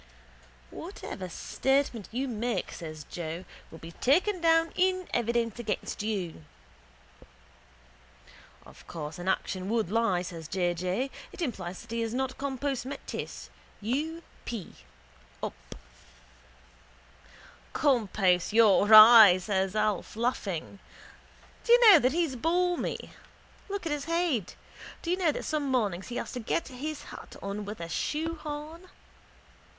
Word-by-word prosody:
—Whatever 185 -1 -7
statement 270 +3 -1
you 260 +4 -2
make, 235 0 -2
says 155 -2 -8
Joe, 170 +3 -6 0.2
will 160 - -11
be 165 +1 -10
taken 350 - +2
down 330 0 +4
in 370 0 +1
evidence 235 -1 0
against 215 -4 -3
you. 190 -7 -3 2.2
—Of - - -16
course 155 0 -6
an 175 - -6
action 190 0 -1
would 220 -5 0
lie, 215 -6 +2
says 165 -3 -7
J. 175 -1 0
J. 185 +10 -2 0.2
It - - -13
implies 190 - -4
that - - -15
he 230 0 -1
is 225 +1 -2
not 260 0 -2
compos 275 -1 -2
mentis. 265 +3 -7 0.3
U. 300 +10 -2 0.2
p: 225 -7 -6 0.7
up. - - -2 2.2
—Compos 210 - +2
your 215 -2 +5
eye! 215 -3 +10
says 190 +1 -1
Alf, 215 -3 -1
laughing. 200 -6 -2 0.8
Do 470 - +4
you 480 -3 +9
know 345 - +9
that 255 -1 +2
he's 325 -3 0
balmy? 350 +6 -1 0.6
Look 400 -2 -4
at 325 - -2
his 295 -1 -2
head. 330 - 0 0.5
Do 335 - -1
you 365 - +1
know 350 -5 +2
that - - -5
some 300 -3 -1
mornings 205 -8 0
he 245 - -6
has - - -4
to 250 - -5
get 245 +7 -2
his 290 +4 -5
hat - - -11
on 200 +1 -4
with 210 +1 -7
a 170 - -5
shoehorn. 315 - -4
235 Hz, 135 wpm, -29 LUFS, 190-300 Hz, 2.2 s, eye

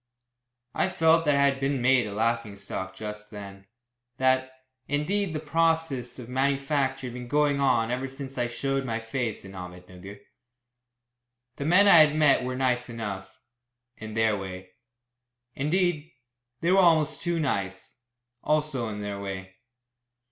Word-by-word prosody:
I - - +1
felt 165 0 +3
that 145 -1 +3
I 140 0 +4
had 135 -1 +1
been 135 0 0
made 125 -2 +3
a - - -6
laughing 115 0 -1
stock 95 -1 -6
just 105 +1 -7
then; 100 -2 -10 0.5
that, 130 0 +2 0.4
indeed, 175 +7 0
the 155 - -2
process 160 -5 0
of 125 -3 -9
manufacture 135 +1 0
had 125 - -6
been 125 0 -7
going 145 +1 +2
on 120 -4 +2
ever 130 +2 -2
since 135 0 -8
I 120 -1 0
showed 135 +3 -2
my 115 -3 -2
face 115 -2 -4
in 95 - -10
Ahmednugger. 90 +1 -10 1.4
The 140 - -4
men 185 +6 +5
I 170 -4 +9
had 155 -1 +6
met 150 -4 +4
were 125 0 -3
nice 125 -1 0
enough 100 -5 -6 0.6
in 110 0 -8
their 110 -1 +2
way. 95 -1 -7 0.8
Indeed, 165 +2 0 0.5
they 170 - +2
were 195 - +5
almost 160 -4 +3
too 170 -1 -1
nice 100 -9 -3 0.5
also 150 -6 0
in 105 -1 -5
their 100 -1 -4
way. 95 -1 -6
130 Hz, 150 wpm, -27 LUFS, 105-150 Hz, 1.4 s, I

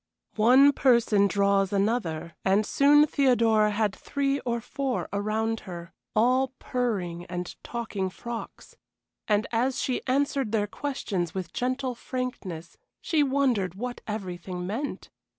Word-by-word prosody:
One 255 +6 +7
person 235 -7 +3
draws 200 -1 +2
another, 195 -6 -1
and 195 +3 +3
soon 290 +4 +5
Theodora 230 -7 +3
had 210 -1 0
three 280 0 -1
or 235 -1 -2
four 270 +2 -3
around 220 +2 -1
her 170 -1 -8 0.2
all 255 +4 +3
purring 190 -9 -2
and 180 0 -5
talking 220 -5 -3
frocks. 235 +4 -8 0.5
And 210 -1 +2
as 245 +3 0
she 255 - -1
answered 270 -3 0
their 210 -2 +2
questions 205 - -3
with 185 -2 -5
gentle 255 +1 -1
frankness, 235 -10 -5 0.2
she 315 -3 +1
wondered 260 - +1
what 245 +4 -5
everything 180 -4 -5
meant. 230 +10 -4
225 Hz, 125 wpm, -27 LUFS, 195-255 Hz, 0.5 s, One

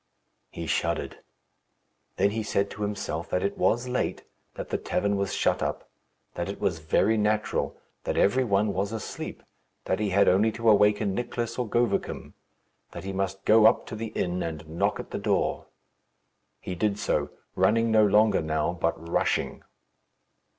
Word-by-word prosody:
He 85 - -6
shuddered. - - -1 1.0
Then 100 +2 +2
he 110 +1 -2
said 100 -2 -1
to 105 - -9
himself 100 -5 -3
that 90 - 0
it 100 - -1
was 120 +2 +1
late; 125 0 -2 0.3
that - - -6
the - - -1
tavern 100 0 0
was 100 -1 -1
shut - - +1
up; - - -3 0.4
that - - -3
it - - -6
was 80 - 0
very 95 +7 +2
natural; 105 0 0 0.3
that - - -1
every 130 +6 +3
one 100 -2 +1
was 100 +2 -1
asleep; 110 -2 -6 0.4
that 95 - 0
he 105 -1 0
had 100 +1 +4
only 105 +5 +4
to 115 +1 -3
awaken 105 -1 +3
Nicless 120 +1 -3
or 120 -3 -2
Govicum; 120 -3 -1 0.6
that - - -7
he 95 0 -4
must 95 0 -3
go 110 0 +7
up - - +2
to - - -7
the 115 +1 -4
inn 90 -3 -2
and 80 -1 -5
knock 90 +6 -1
at - - -8
the - - -3
door. - - 0 0.9
He 90 - -5
did 100 +3 0
so, 105 - 0 0.2
running 115 +1 +2
no 110 -1 +5
longer 105 +1 +4
now, 80 +1 0
but 85 -1 0
rushing. 85 - 0
100 Hz, 170 wpm, -27 LUFS, 95-110 Hz, 1.0 s, go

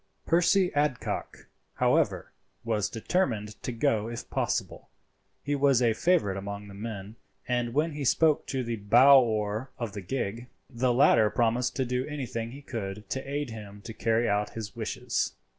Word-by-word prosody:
Percy 180 +2 +3
Adcock, 145 -4 -2 0.3
however, - - +1 0.3
was 110 -4 0
determined 115 - -1
to - - -3
go 110 -2 0
if 120 0 -6
possible. - - -2 0.5
He 145 - -1
was 140 -3 +3
a 120 -3 +3
favourite 130 - +1
among 100 +1 -6
the - - -10
men, 105 0 -7 0.3
and 120 -1 -1
when 155 +3 +2
he 145 -1 -5
spoke 155 +3 +3
to 130 -2 -2
the 115 -1 -3
bow 125 +7 +7
oar 110 +1 -1
of 115 -5 -4
the 100 - -5
gig, 115 +3 -3 0.2
the 125 0 0
latter 120 -4 +5
promised 120 +3 +1
to 130 - 0
do 125 +1 -1
anything 125 -6 -4
he 140 +4 -11
could 105 -4 -6
to 135 0 -3
aid 145 -3 -2
him 105 -2 -9
to 115 - -7
carry 115 +1 +1
out 105 0 +1
his 110 -1 -6
wishes. 120 +2 -2
120 Hz, 165 wpm, -28 LUFS, 105-135 Hz, 0.5 s, bow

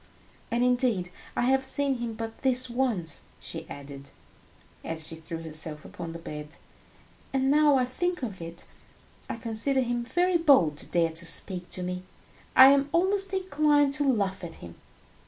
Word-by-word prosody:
And 235 +1 +1
indeed, 245 -8 +2 0.2
I - - 0
have 265 +2 +3
seen 270 -1 +2
him 235 -2 -4
but 225 0 -6
this 255 -2 +2
once," 230 - -1 0.2
she - - -7
added, 140 0 -9 0.7
as 160 -1 -4
she 165 - -6
threw 165 0 -7
herself 155 -1 -5
upon 165 -1 -7
the 165 - -7
bed, 150 -2 -8 0.8
"and 270 0 +1
now 295 -1 +5
I 255 - +2
think 350 +6 -2
of 200 -7 -5
it, 165 +1 -9 0.6
I - - -2
consider 230 +4 0
him 240 -1 -1
very 355 +7 +2
bold 260 - +4
to - - -4
dare 165 -1 +1
to 165 +1 -7
speak 180 +1 -2
to 180 - -2
me. 180 0 -3 0.5
I 260 +1 +10
am 280 +1 +3
almost 385 +3 +2
inclined 300 -6 +2
to 285 +2 +1
laugh 195 -5 -1
at 165 -1 -7
him. 85 -1 -11
235 Hz, 170 wpm, -27 LUFS, 170-275 Hz, 0.8 s, I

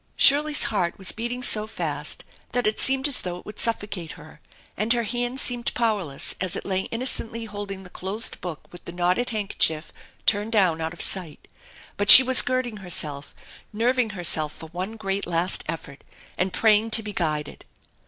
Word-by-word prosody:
Shirley's 290 +1 +4
heart 185 -6 -2
was 190 - +2
beating 240 +2 -5
so 215 -3 +2
fast 220 - -5 0.3
that 245 0 -1
it 215 - -1
seemed 265 +1 +3
as 280 - +3
though 180 -1 -5
it - - -15
would 210 - -10
suffocate 205 -7 -3
her, 150 0 -16 0.3
and 215 +3 -2
her 235 -1 -1
hand 245 +3 -3
seemed 245 -2 -1
powerless 205 - 0
as 185 -2 0
it - - -6
lay 190 -1 -2
innocently 230 -1 -2
holding 205 -2 -8
the 180 - -13
closed 200 +5 -3
book 175 -4 -7
with 175 - -13
the - - -8
knotted 180 +7 -1
handkerchief 195 -7 -1 0.3
turned 210 +2 +1
down 180 -6 +1
out 160 +1 -4
of 175 - +3
sight; 175 -6 +2 0.5
but 205 0 -2
she 260 - +12
was 260 0 +8
girding 255 -3 -3
herself, 155 -7 -1 0.4
nerving 240 +2 0
herself 155 -3 +3
for 160 +1 -12
one 185 +6 -6
great 195 -2 -3
last 175 +2 0
effort, 145 -4 -8 0.3
and 185 +1 -2
praying 220 +2 +2
to 225 0 +2
be 210 0 -7
guided. 155 -5 -4
205 Hz, 180 wpm, -23 LUFS, 175-230 Hz, 0.5 s, she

